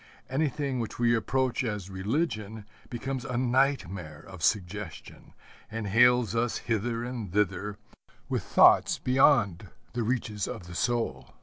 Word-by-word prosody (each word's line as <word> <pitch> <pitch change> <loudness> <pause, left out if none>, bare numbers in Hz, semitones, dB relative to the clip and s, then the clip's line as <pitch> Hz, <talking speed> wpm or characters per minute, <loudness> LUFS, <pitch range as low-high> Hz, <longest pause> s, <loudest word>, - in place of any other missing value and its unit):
Anything 140 -2 -1
which 115 - -4
we 120 0 +3
approach 130 +3 0
as 105 -5 -4
religion 105 - -2 0.2
becomes 130 +1 -4
a 125 - -3
nightmare 120 - 0
of 95 -3 -11
suggestion, 95 +1 -3 0.4
and 110 -1 -4
hales 120 +1 +4
us 115 0 0
hither 115 +1 -2
and 120 -6 -5
thither 100 0 0 0.5
with - - -1
thoughts - - +5
beyond 125 - +3 0.2
the 120 - -1
reaches 110 -4 -1
of 90 - -6
the 90 - -10
soul. 75 - -2
115 Hz, 130 wpm, -28 LUFS, 100-125 Hz, 0.5 s, thoughts